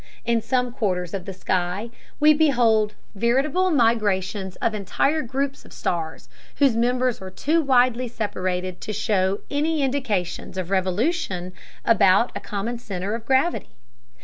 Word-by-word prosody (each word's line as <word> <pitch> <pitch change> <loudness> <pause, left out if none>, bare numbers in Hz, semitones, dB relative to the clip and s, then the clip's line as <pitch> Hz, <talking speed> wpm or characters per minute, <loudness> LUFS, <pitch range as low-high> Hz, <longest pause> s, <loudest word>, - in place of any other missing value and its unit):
In 235 -1 +2
some 250 +1 0
quarters 180 -6 -1
of 190 -3 -4
the 195 - -5
sky 185 +4 -2 0.3
we 305 0 +7
behold 235 -8 +3 0.2
veritable 270 - +1
migrations 205 - +1
of 230 - -1
entire 275 - 0
groups 275 +2 -3
of - - -17
stars 160 -2 -3 0.3
whose 275 -5 +3
members 250 0 +1
are 190 - -6
too 310 - +1
widely 255 -3 +3
separated 185 -5 -3
to 215 - -4
show 200 -2 0
any 300 +1 +1
indications 220 -11 -2
of 185 0 -4
revolution 190 - 0 0.3
about 225 +1 +4
a - - -2
common 225 +3 -4
center 200 -2 -4
of 230 0 -5
gravity. 270 +6 +1
225 Hz, 140 wpm, -23 LUFS, 190-260 Hz, 0.3 s, we